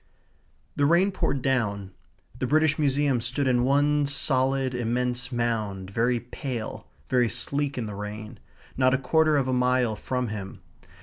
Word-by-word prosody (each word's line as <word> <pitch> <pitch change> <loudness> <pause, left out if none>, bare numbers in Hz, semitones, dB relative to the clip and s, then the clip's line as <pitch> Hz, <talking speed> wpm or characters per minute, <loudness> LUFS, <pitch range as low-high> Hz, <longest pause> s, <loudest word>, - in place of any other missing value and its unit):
The 145 - +2
rain 175 +5 +4
poured 140 -8 -1
down. 100 -7 -1 0.5
The 130 - -1
British 155 +2 +2
Museum 140 -3 +2
stood 130 +4 -1
in 120 -1 +3
one 145 +2 +2
solid 135 -1 +1
immense 125 +1 -1
mound, 110 -6 -2
very 120 +3 +1
pale, 120 -1 -6 0.2
very 125 -2 +2
sleek 140 +4 -1
in 120 - -2
the 105 - -6
rain, 105 +2 -7 0.4
not 130 0 +3
a - - +1
quarter 155 +3 +2
of 135 -2 +1
a 130 - 0
mile 125 -2 +2
from 125 +1 -3
him. 95 -2 -7
125 Hz, 150 wpm, -26 LUFS, 115-140 Hz, 0.5 s, rain